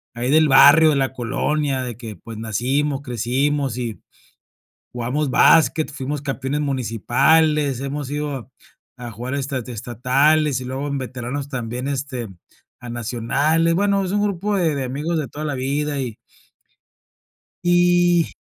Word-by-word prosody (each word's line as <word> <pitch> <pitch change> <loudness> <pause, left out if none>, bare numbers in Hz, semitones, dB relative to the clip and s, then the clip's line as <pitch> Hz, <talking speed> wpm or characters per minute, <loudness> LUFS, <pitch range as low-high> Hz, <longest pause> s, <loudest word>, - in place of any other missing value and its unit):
ahí 125 +3 -1
del 155 0 +5
barrio, 145 +4 +7
de 150 - +2
la 135 -1 0
colonia, 135 +2 -1
de 120 -3 -5
que, 115 -2 -8
pues, 115 -2 -10
nacimos, 135 +6 -1
crecimos, 130 +2 -1
y 115 -3 -5 0.9
jugamos 130 +4 -2
basket, 160 +3 +4
fuimos 140 +1 -4
campeones 135 0 -3
municipales, 140 +2 +2
hemos 140 0 -4
ido 145 -4 -4 0.5
a 120 -1 -7
jugar 120 +5 -6
esta 140 -1 -2
estatales, 130 +5 +1
y 125 - -7
luego 135 +3 -4
en 140 -1 -2
veteranos 130 +2 -5
también, 125 0 -4
este, 130 -4 -4 0.5
a 120 - -8
nacionales. 125 +8 0
Bueno, 200 +1 +1
es 185 - -3
un 205 - +1
grupo 205 0 -1
de 165 -5 +1
de 135 -2 -2
amigos 150 +6 -3
de 145 - -3
toda 155 +5 -6
la 145 - -2
vida 140 +2 -2
y 125 -5 -4 1.5
y. 175 -1 +3
140 Hz, 145 wpm, -21 LUFS, 125-150 Hz, 1.5 s, barrio